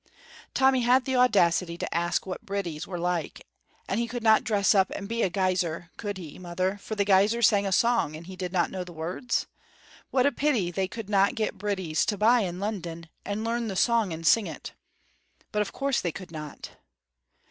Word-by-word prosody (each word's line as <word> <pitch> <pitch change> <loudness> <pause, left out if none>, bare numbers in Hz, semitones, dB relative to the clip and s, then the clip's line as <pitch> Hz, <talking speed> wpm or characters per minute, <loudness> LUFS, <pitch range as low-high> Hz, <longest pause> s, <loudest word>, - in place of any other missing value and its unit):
Tommy 265 -1 +4
had 250 +2 +4
the 265 - -1
audacity 180 -8 +3
to - - -4
ask 170 0 0
what 185 - -6
bridies 180 -6 -4
were 180 - -5
like. 175 -2 -2 0.4
And 195 - -1
he 235 - 0
could 240 0 -5
not 220 -1 +5
dress 205 -2 +3
up 190 -2 +3
and 200 - -5
be 230 +2 -2
a 190 - +2
guiser, 180 -2 -1
could 205 -3 -5
he, 165 -4 -9
mother, 185 +2 -2
for 220 - -6
the 200 -1 +1
guisers 205 +4 +4
sang 200 -1 +2
a - - -2
song, 230 -6 +2
and 160 +2 -9
he 190 +1 -9
did 180 -1 -4
not 175 -2 +1
know 185 -1 -4
the 175 -1 -11
words? 175 +10 -2 0.6
What 255 -1 +2
a 285 - +4
pity 245 -10 0
they 190 +1 -1
could 225 +1 -7
not 200 +3 +3
get 215 -3 -2
bridies 185 -6 -1
to 205 - 0
buy 230 +5 +5
in 180 -4 -2
London, 170 -5 -5
and 205 +2 -3
learn 230 0 -1
the 195 - -4
song 230 -2 +2
and 165 0 -6
sing 215 +5 +4
it. - - -8 0.8
But 210 - +1
of 205 - -2
course 275 -2 0
they 170 - -1
could 185 +1 -9
not! 150 -2 -8
195 Hz, 210 wpm, -27 LUFS, 175-225 Hz, 0.8 s, not